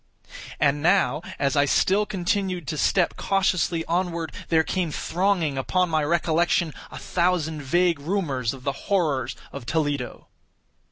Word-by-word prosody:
And 145 0 +2
now, 160 -5 +3 0.2
as 140 +1 0
I 145 0 +4
still 200 +8 +2
continued 185 -3 -1
to 160 - -2
step 180 -3 +2
cautiously 185 -4 +1
onward, 170 -1 -1 0.2
there 160 -1 +4
came 180 0 -1
thronging 170 -4 0
upon 180 +5 0
my 155 -1 +2
recollection 170 +1 +1 0.2
a - - -9
thousand 170 -4 0
vague 170 +3 +2
rumors 140 - -1
of 130 -2 -10
the 140 - 0 0.2
horrors 145 - +1 0.2
of 120 - -8
Toledo. 145 -5 -2
165 Hz, 135 wpm, -24 LUFS, 145-180 Hz, 0.2 s, I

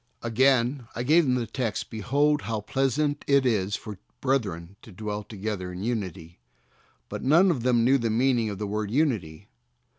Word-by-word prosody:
Again 125 +1 +2
I 120 - -2
gave 160 +5 +4
them 130 -2 +2
the 120 -2 -1
text, 115 0 -3
"Behold 145 +7 +1
how 110 -2 -3
pleasant 135 +5 0
it 140 -1 +4
is 105 -4 +1
for 105 -4 -8 0.2
brethren 100 -10 -1
to 110 - -14
dwell 105 +2 -4
together 100 -3 -5
in 90 +2 -6
unity." 95 - -4 0.7
But - - -6
none 170 +8 +5
of 135 -8 -2
them 120 -1 +2
knew 135 +3 +4
the 115 -1 -1
meaning 120 0 +2
of 100 - -5
the 105 - -3
word 105 0 -3
"unity." 105 - -1
115 Hz, 175 wpm, -26 LUFS, 105-135 Hz, 0.7 s, none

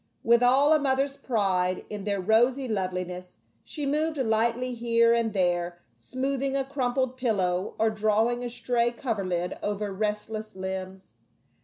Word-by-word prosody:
With 235 +1 +4
all 270 +5 +5
a 310 - +4
mother's 275 0 +1
pride 195 -9 0
in 205 -2 -6
their 200 -1 -1
rosy 240 +7 +2
loveliness 185 -3 -4 0.3
she 295 -2 -5
moved 305 +2 0
lightly 235 +1 +1
here 230 0 +3
and 230 -1 +1
there, 175 -3 0 0.2
smoothing 270 - -2
a 275 - +1
crumpled 260 -1 -1
pillow, 190 -7 0
or 220 0 +2
drawing 220 +3 +1
a 245 - -3
stray 240 0 0
coverlid 195 -8 -3
over 205 -1 -2
restless 215 +1 -3
limbs. 190 0 -6
225 Hz, 140 wpm, -27 LUFS, 190-255 Hz, 0.3 s, all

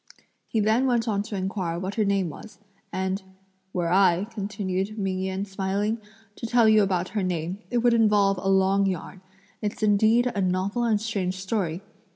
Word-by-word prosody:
He 225 - -1
then 220 +5 +3
went 240 -2 +1
on 205 -2 +1
to 210 0 -6
enquire 185 -3 -2
what 185 +3 -4
her 220 - +1
name 195 -3 +1
was; 205 +8 -11 0.3
and 190 +1 -2 0.5
"Were 175 -2 0
I," 185 -1 +4
continued 200 -1 -3
Ming 190 -2 -1
Yen 190 +1 -2
smiling, 200 +3 -1 0.4
"to 230 - -4
tell 235 -1 +4
you 215 -1 +6
about 185 -2 0
her 205 +1 -2
name 180 0 -2
it 245 - 0
would 240 -1 +5
involve 205 -4 +3
a 195 - -1
long 195 +1 +3
yarn; 185 0 -4 0.4
it's 210 0 -3
indeed 220 +4 +4
a 200 - -1
novel 190 +6 0
and 220 -3 +2
strange 195 -4 -2
story! 190 -3 -2
195 Hz, 180 wpm, -25 LUFS, 185-215 Hz, 0.5 s, you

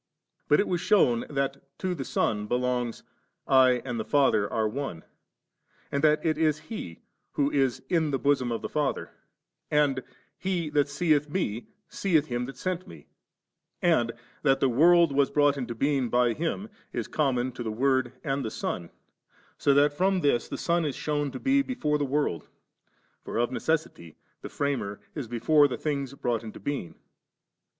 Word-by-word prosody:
But 150 - +4
it 205 - +2
was 175 -2 -1
shewn 180 - +3
that 140 -2 -2 0.2
to 185 -1 -2
the 145 -6 -4
Son 105 -4 -1
belongs, 125 0 -1 0.4
*I 130 -2 +4
and 120 -3 -3
the - - -1
Father 135 -8 +2
are 110 -1 +1
One,* 115 -8 -5 0.9
and 140 +1 -1
that 155 +1 +3
it 155 -1 +1
is 155 -2 +2
He 150 - -8 0.3
*Who 145 0 +1
is 135 -3 +1
in 165 -4 +1
the 135 - 0
bosom 135 -3 +1
of 115 - -3
the - - -2
Father,' 150 -2 -2 0.6
and, 145 -3 +2 0.2
* - - -40
He 170 -5 -1
that 145 -1 +2
seeth 150 -1 +1
Me, 120 - -2 0.2
seeth 165 -7 +1
Him 120 -3 -2
that 135 0 -9
sent 185 +3 -3
Me 80 -3 -12 0.8
3;' 175 - +3
and 120 -7 +2 0.3
that 135 -2 +3
*the 135 - +3
world 170 +5 +5
was 140 0 +2
brought 145 -1 +3
into 125 -4 -4
being 135 0 +1
by 120 -1 +3
Him,' 170 - -3 0.2
is - - -3
conmion 130 -4 0
to 120 - -7
the 110 -2 -3
Word 130 +1 +1
and 135 -2 -1
the - - -2
Son; 85 -5 -4 0.7
so 140 - +3
that 145 +1 +4
from 185 +3 +1
this 140 -6 +2
the - - -4
Son 170 0 +1
is 145 -4 -2
shewn 145 -1 -1
10 130 - -8
be 275 +1 +4
before 155 - -1
the 145 - +1
world; 135 - -1 0.8
for - - -5
of 120 +1 +1
necessity 130 - -2 0.3
the - - -7
Framer 130 -8 -2
is 145 -6 -5
before 145 +6 +4
the 130 - -4
things 140 -3 -3
brought 120 -4 -1
into 110 - -8
being. 140 - -4
140 Hz, 180 wpm, -27 LUFS, 120-155 Hz, 0.9 s, world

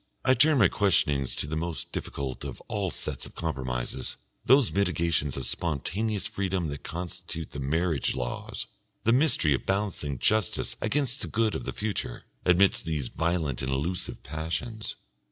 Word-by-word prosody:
I 130 - +6
turn 150 +4 +5
my 105 -7 +7
questionings 75 -9 +2
to - - -2
the 75 +2 -3
most 85 +1 -3
difficult 65 -2 -4
of - - -5
all - - -2
sets - - -4
of - - -16
compromises, 65 -7 -2 0.3
those 135 -1 +6
mitigations 85 -7 +1
of 65 - -3
spontaneous 90 - -1
freedom 95 -4 -1
that 70 0 -5
constitute 90 -1 -5
the 70 - -5
marriage 80 +2 +1
laws, 60 -2 -3 0.4
the 115 - +4
mystery 130 - +4
of 65 - -2
balancing 95 -8 0
justice 110 - +1
against 135 -2 +1
the - - -2
good 110 -1 +1
of - - -3
the - - -2
future, 100 - -3 0.2
amidst 90 +2 +5
these 75 -6 -1
violent 80 -5 0
and 65 - -1
elusive 85 +7 -2
passions. 105 +9 -3
85 Hz, 155 wpm, -28 LUFS, 70-105 Hz, 0.4 s, my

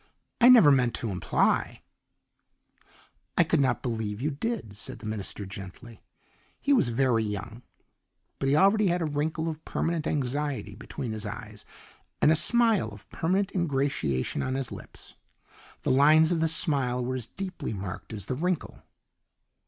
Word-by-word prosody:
I 240 - +8
never 225 -13 +8
meant 125 -4 +2
to 115 - -3
imply 90 - 0 0.8
" - - -33
"I - - +6
could - - +1
not 130 -3 +1
believe 110 -4 -3
you 145 +5 -1
did," 150 - -4
said 105 - -5
the - - -12
minister 105 -1 -4
gently. 100 +3 -10 0.6
He 285 - +2
was 235 - +3
very 120 -1 +2
young, 105 +2 -5 0.8
but 135 - 0
he 140 - +3
already 200 +5 +4
had 175 -1 +1
a - - 0
wrinkle 155 +2 -2
of 160 -1 -5
permanent 165 -2 -2
anxiety 145 0 -2
between 120 - -6
his 110 -1 -4
eyes - - -8 0.5
and 150 - +5
a - - +5
smile 225 - +3
of 105 0 -12
permanent 190 +4 0
ingratiation 135 - -1
on 130 0 -2
his 135 -2 -3
lips. - - -9 0.7
The - - +1
lines 155 +5 +5
of 170 - +1
the 160 - +2
smile 135 -6 +1
were 130 - -2
as 125 -3 -4
deeply 190 +3 -6
marked 100 0 -6
as 105 -4 -3
the - - -3
wrinkle. 175 +5 -2
135 Hz, 160 wpm, -27 LUFS, 110-160 Hz, 0.8 s, I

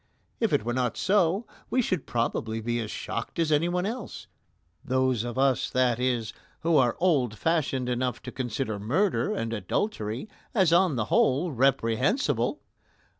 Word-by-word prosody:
If 225 -3 +1
it 145 - +2
were 120 - -1
not 125 -2 -1
so, 195 +2 +2 0.2
we 255 - +1
should 185 -8 -2
probably 115 -1 -1
be 120 +1 -1
as 110 -2 -4
shocked 115 - -5
as 165 -2 +1
anyone 175 +4 +1
else 225 +1 -5 0.6
those 130 -3 +1
of 120 +1 -5
us, 135 -2 +2
that 125 -2 +1
is, 120 -3 0 0.3
who 165 0 +2
are 120 -3 +3
old 135 - +2
fashioned 145 -5 0
enough 125 -1 -1
to 125 - -6
consider 120 -4 -3
murder 120 - +1
and 115 0 -2
adultery 115 - -2 0.3
as 185 -6 +4
on 175 -4 +4
the 115 -3 0
whole 145 +7 +3
reprehensible. 135 - +1
130 Hz, 155 wpm, -27 LUFS, 120-170 Hz, 0.6 s, as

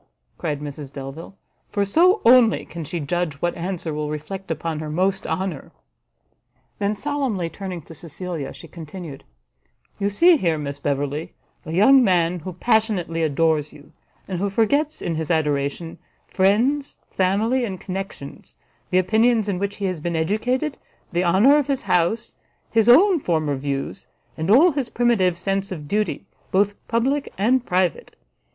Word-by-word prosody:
cried 150 -4 -3
Mrs 145 -1 -7
Delvile, 140 +7 -8 0.3
"for 200 -1 0
so 360 - +4
only 235 -1 +5
can 170 -1 -7
she 170 +3 -4
judge 160 +1 -2
what 175 +5 -1
answer 175 -2 -4
will 150 0 -3
reflect 155 +6 -6
upon 160 0 -3
her 155 -1 -5
most 190 +5 0
honour." 185 -7 -3 1.1
Then, 205 +1 0
solemnly 245 - -2
turning 185 -5 -6
to 165 - -12
Cecilia, 165 -1 -6
she 165 - -12
continued: 160 -2 -9 0.8
"You 200 - +1
see 335 - +5
here, 170 - 0
Miss 140 -1 -5
Beverley, 145 +2 -2 0.3
a - - -5
young 250 +10 +6
man 175 -3 +2
who 180 +3 -7
passionately 190 -5 0
adores 155 -1 +1
you, 145 - -16 0.4
and 185 -3 -3
who 200 +2 0
forgets 285 +9 +1
in 170 - -1
his 160 -1 -3
adoration 150 0 -1 0.3
friends, 240 +10 +1
family, 215 +7 +1
and 190 -6 -4
connections, 190 -7 -7 0.3
the 180 - +2
opinions 220 +3 +3
in 190 -3 -1
which 200 +1 -2
he 200 - -4
has 185 -3 -2
been 170 +2 -3
educated, 245 - -1 0.3
the 175 0 +1
honour 205 - +5
of 285 - -2
his 275 -2 -1
house, 180 +6 0 0.4
his 225 0 +3
own 360 +8 +6
former 155 - 0
views, 135 0 -4 0.3
and 160 +3 -3
all 295 - +6
his 275 -4 -3
primitive 210 -8 +2
sense 195 +2 -2
of 150 -5 -6
duty, 210 +1 -1 0.3
both 200 +2 +2
public 265 +5 0
and 245 +5 +2
private! 180 -1 0
185 Hz, 155 wpm, -22 LUFS, 160-220 Hz, 1.1 s, young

